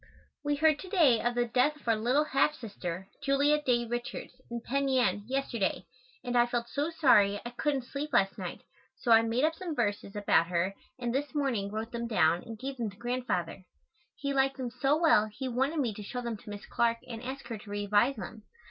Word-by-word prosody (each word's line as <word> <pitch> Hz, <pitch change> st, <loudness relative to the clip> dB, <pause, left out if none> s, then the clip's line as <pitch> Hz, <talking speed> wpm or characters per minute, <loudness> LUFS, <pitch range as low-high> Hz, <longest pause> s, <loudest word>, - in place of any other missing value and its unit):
We 290 Hz, 0 st, +1 dB
heard 310 Hz, 0 st, +3 dB
to 375 Hz, -, -8 dB
day 305 Hz, -, +4 dB
of 240 Hz, 0 st, 0 dB
the 240 Hz, 0 st, +2 dB
death 250 Hz, +5 st, +2 dB
of 295 Hz, -, -20 dB
our 230 Hz, -, +4 dB
little 245 Hz, +7 st, +2 dB
half 300 Hz, +1 st, +2 dB
sister, 190 Hz, -, -6 dB
Julia 285 Hz, +2 st, +3 dB
Dey 245 Hz, -4 st, +1 dB
Richards, 240 Hz, +2 st, -5 dB, 0.2 s
in 235 Hz, 0 st, -3 dB
Penn 275 Hz, +4 st, -1 dB
Yan, 240 Hz, -7 st, +2 dB
yesterday, 255 Hz, -6 st, -1 dB, 0.4 s
and 245 Hz, -1 st, -3 dB
I 240 Hz, 0 st, +5 dB
felt 240 Hz, -1 st, -2 dB
so 295 Hz, +3 st, -1 dB
sorry 210 Hz, -11 st, +4 dB
I 240 Hz, -, -5 dB
couldn't 270 Hz, +2 st, -1 dB
sleep 285 Hz, +4 st, -5 dB
last 200 Hz, -6 st, +3 dB
night -, -, -6 dB, 0.4 s
so 240 Hz, -, -1 dB
I 225 Hz, 0 st, +8 dB
made 230 Hz, +3 st, 0 dB
up 315 Hz, +1 st, +3 dB
some 330 Hz, -1 st, -5 dB
verses 205 Hz, -3 st, -1 dB
about 170 Hz, -5 st, +3 dB
her 180 Hz, +2 st, 0 dB, 0.2 s
and 240 Hz, -2 st, -2 dB
this 290 Hz, +3 st, -2 dB
morning 250 Hz, -9 st, 0 dB
wrote 220 Hz, +2 st, -4 dB
them 235 Hz, 0 st, -3 dB
down 170 Hz, -6 st, +3 dB
and 225 Hz, -1 st, -9 dB
gave 265 Hz, +3 st, -5 dB
them 230 Hz, -3 st, -2 dB
to 200 Hz, -, -15 dB
Grandfather. 240 Hz, -8 st, -2 dB, 0.5 s
He 280 Hz, 0 st, -2 dB
liked 270 Hz, 0 st, +2 dB
them 250 Hz, -3 st, -4 dB
so 270 Hz, +4 st, +2 dB
well 315 Hz, -10 st, +4 dB
he 260 Hz, +5 st, -5 dB
wanted 265 Hz, +6 st, 0 dB
me 250 Hz, -7 st, 0 dB
to 210 Hz, -, -8 dB
show 230 Hz, +5 st, -5 dB
them 235 Hz, -2 st, -3 dB
to 205 Hz, -, -13 dB
Miss 205 Hz, 0 st, -7 dB
Clark 235 Hz, -1 st, +1 dB
and 230 Hz, -2 st, -6 dB
ask 265 Hz, +2 st, -6 dB
her 225 Hz, -3 st, -4 dB
to 205 Hz, -, -13 dB
revise 205 Hz, +5 st, +2 dB
them. 215 Hz, +1 st, -8 dB
240 Hz, 220 wpm, -30 LUFS, 215-275 Hz, 0.5 s, I